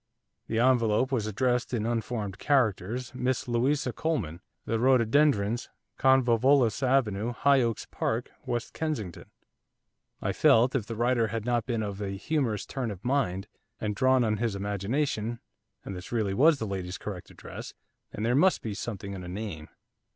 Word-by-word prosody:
The 115 - -2
envelope 120 0 +3
was 115 -5 0
addressed, 125 +3 0
in 110 -2 -1
unformed 115 -4 -2
characters, 125 -2 0
'Miss 125 0 -1
Louisa 125 +2 +1
Coleman, 100 - -2 0.2
The 115 - -1
Rhododendrons, 120 -2 +3 0.3
Convolvulus 130 -1 +4
Avenue, 120 -4 +1
High 140 +3 +4
Oaks 115 -3 -1
Park, - - -2
West 120 -1 -3
Kensington.' 135 - -4 0.9
I - - -1
felt, 120 +3 +4
if 115 -6 -1
the 115 - -4
writer 120 0 +2
had 110 0 -4
not 120 -1 0
been 115 -3 -1
of 100 -1 -5
a 100 -1 -3
humorous 115 -4 -1
turn 130 -4 -3
of 100 -1 -8
mind, 120 -9 0 0.3
and 105 -1 -2
drawn 130 +1 +4
on 110 -2 +1
his 115 -1 -1
imagination, 110 +4 -2 0.5
and 95 - -5
this 90 0 -9
really 110 -5 0
was 150 +8 +5
the 115 - -3
lady's 95 -3 -4
correct 95 -4 -7
address, - - -9 0.4
then 105 - -5
there 120 +2 +2
must 180 +8 +3
be 110 - -3
something 100 -1 -5
in 95 -2 -6
a - - -7
name. 95 -5 -5
115 Hz, 160 wpm, -28 LUFS, 105-130 Hz, 0.9 s, was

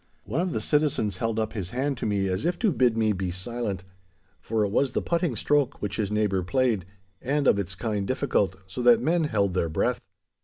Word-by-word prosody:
One 135 +11 -1
of 180 0 -1
the - - -2
citizens 145 -9 +1
held 115 -2 -1
up 110 -1 -1
his 95 -6 -4
hand 135 +5 -1
to - - -1
me 100 -2 +1
as 95 +5 -1
if 175 +2 0
to 220 -5 +2
bid 125 -6 +2
me 110 -1 +2
be 95 -1 -2
silent, 100 +1 -4 0.6
for 110 -2 0
it 100 - -3
was 130 +3 +1
the - - 0
putting 170 -6 0
stroke 145 +4 +1
which 100 -1 -3
his 105 -3 -1
neighbour 105 -3 +1
played, 115 -1 +1 0.4
and 140 +2 0
of 100 - +4
its 95 -1 -4
kind 105 -1 -2
difficult, 130 -8 +1
so 95 +7 -6
that 120 -2 +6
men 160 +6 +1
held 100 -8 +1
their 85 -3 0
breath. 80 - 0
110 Hz, 220 wpm, -26 LUFS, 100-135 Hz, 0.6 s, that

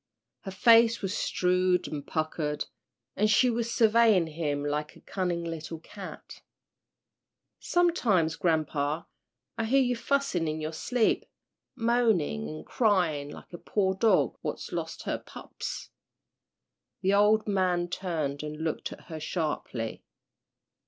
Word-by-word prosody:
Her - - -8
face 230 +3 +5
was 195 +1 -1
shrewd 180 0 +2
and 145 -2 -5
puckered, 155 -1 -2 0.5
and 215 +2 +2
she 245 +4 +5
was 230 0 -2
surveying 220 -5 +5
him 150 -3 -2
like 150 +1 -2
a - - -16
cunning 175 -3 -2
little 165 -1 -5
cat. 190 +4 -10 1.2
"Sometimes, 225 - +2
grampa, 155 -2 0 0.5
I 225 - +1
hear 265 +5 +4
you 245 -1 +1
fussin' 240 - 0
in 155 0 -2
your 155 +1 -4
sleep 235 +8 +1 0.5
moanin' 220 - +1
an' 75 0 -7
cryin' 175 - +1
like - - -12
a 175 - -7
poor 190 -2 0
dog 215 +4 +2
what's - - -5
lost - - -4
her - - -2
pups." - - -8 1.1
The 195 +1 +2
old 210 +2 +4
man 185 -3 +1
turned 160 -6 -3
and 150 0 -6
looked 160 0 -3
at - - -10
her 160 -1 -8
sharply. 150 -8 -3
180 Hz, 130 wpm, -28 LUFS, 155-215 Hz, 1.2 s, face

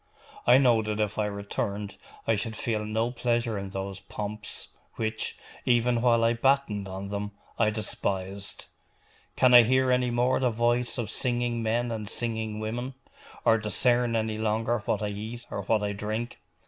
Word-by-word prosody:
I 125 +1 +8
know 120 -4 +5
that 105 0 -3
if 105 0 -1
I 105 - +2
returned 100 0 -3 0.3
I 115 - +3
should 110 +2 -3
feel 110 -1 -1
no 110 +3 0
pleasure 120 -2 0
in 100 0 -5
those 95 0 -5
pomps, 105 +1 -6 0.3
which, 110 -1 -2 0.3
even 120 -1 +3
while 115 -2 +4
I 115 +1 +4
battened 120 -5 +1
on 95 +1 -6
them, 100 0 -4 0.3
I 110 -2 +4
despised. 100 -2 -3 0.7
Can 125 -1 +5
I 120 - +11
hear 130 +2 +3
any 125 0 +2
more 120 +2 +2
the 130 -1 +2
voice 120 +2 +1
of 115 -4 -2
singing 120 -1 0
men 115 +2 0
and 105 -2 -4
singing 110 -2 -2
women; 120 +4 -4 0.5
or 115 - +5
discern 120 +3 +2
any 110 -1 -1
longer 110 +2 +1
what - - 0
I 105 - 0
eat 110 +4 -6
or 100 - -2
what 105 +2 +1
I 100 0 -1
drink? 110 +4 -4
110 Hz, 170 wpm, -28 LUFS, 105-120 Hz, 0.7 s, I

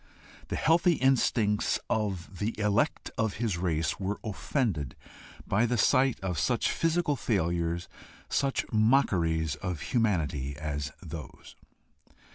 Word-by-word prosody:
The - - -3
healthy 170 +2 +4
instincts 120 -6 +2
of 100 -4 -2
the 110 +2 -2
elect 105 +7 +1
of 110 -3 0
his 105 -6 -1
race 80 -2 0
were 100 +1 -2
offended 105 - -2 0.5
by 110 +5 +2
the 120 +1 0
sight 130 +2 +3
of 90 -4 -2
such - - +1
physical 165 -2 +1
failures, 85 -6 -1 0.4
such 135 -1 0
mockeries 85 - +2
of 85 +1 -4
humanity 75 - 0
as 75 -1 -3
those. 80 -5 -9
100 Hz, 115 wpm, -29 LUFS, 80-120 Hz, 0.5 s, healthy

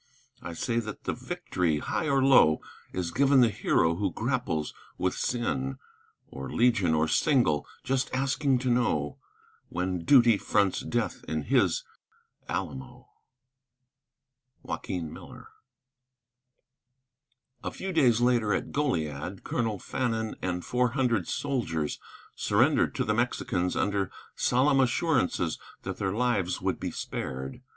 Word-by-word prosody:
I 85 - -6
say 115 +7 -1
that 110 -3 -6
the - - -1
victory, 85 -4 -1
high 150 - -2
or 135 -1 +3
low, 125 - +6 0.3
Is 90 -2 -3
given 135 +2 +4
the 120 - +5
hero 85 -5 +1
who 100 -1 0
grapples 115 - -2 0.2
with 90 0 0
sin, 70 - -2 0.5
Or 70 0 -8
legion 115 -9 +3
or 80 +1 +2
single; 100 - +2 0.2
just 135 0 0
asking 135 +1 +1
to 125 - +3
know 75 -12 0 0.5
When 90 -1 -2
duty 120 -3 +6
fronts 100 -2 +1
death - - -2
in 80 -1 -2
his - - +2 0.7
Alamo. 125 +7 -5 1.6
JOAQUIN 85 -4 -4
MILLER. - - -12 2.1
A - - -2
few 190 0 -5
days 125 -8 +4
later, 120 -3 +3
at - - -3
Goliad, 90 - -2
Colonel 115 -3 -1
Fannin 110 +1 -2
and 90 -1 -2
four 125 -1 +1
hundred 120 - +1
soldiers 95 - -2 0.4
surrendered - - +2
to - - 0
the - - +1
Mexicans 90 0 0
under 100 -2 0 0.2
solemn 135 +2 +3
assurances 125 - +1 0.2
that - - -4
their 95 -2 -1
lives 105 -5 0
would - - -1
be - - -3
spared. 65 +1 -5
110 Hz, 125 wpm, -28 LUFS, 85-125 Hz, 2.1 s, low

